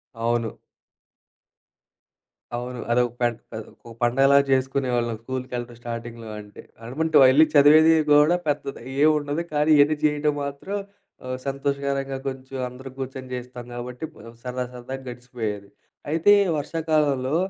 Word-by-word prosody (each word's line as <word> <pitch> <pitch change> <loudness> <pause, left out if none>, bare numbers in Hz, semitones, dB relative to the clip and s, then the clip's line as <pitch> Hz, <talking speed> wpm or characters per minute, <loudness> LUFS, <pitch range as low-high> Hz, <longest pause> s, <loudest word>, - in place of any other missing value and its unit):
అవును. 115 0 -1 2.0
అవును. 125 +1 -5
అదొక 120 0 +2
పెంట్ 120 -1 +1
కాదు. 110 -1 -7 0.2
ఒక 115 - -10
పండగలాగా 135 +3 +5
జేసుకునేవాళ్ళం 130 -3 0
స్కూలుకెళ్ళటం 125 -1 -5
స్టార్టింగ్‌లో 115 -1 -7
అంటే. 105 0 -12 0.2
ఆడమంటో 155 +8 +2
యెళ్లి 145 +5 +6
చదివేది 155 +3 +7 0.2
గూడా 150 +4 +5
పెద్దది 140 -3 -2 0.2
ఏవుండదు. 150 +1 +2
కానీ 150 +1 +2
ఇయన్నీ 145 +2 +5
జేయడం 150 0 +2
మాత్రం 140 +8 -5 0.5
ఆహ్, 130 0 -3
సంతోషకరంగా 140 0 -2
కొంచెం 130 0 -6
అందరూ 130 +2 -10
గూర్చొని 130 0 -6
జేస్తాం 125 -1 -7
గాబట్టి 125 +4 -6 0.4
సరదా 125 0 -3
సరదాగా 130 +2 -7
గడిచిపోయేది. 115 -5 -5 0.4
అయితే 165 +6 +4 0.3
వర్షాకాలంలో 150 -3 0
130 Hz, 115 wpm, -24 LUFS, 120-145 Hz, 2.0 s, చదివేది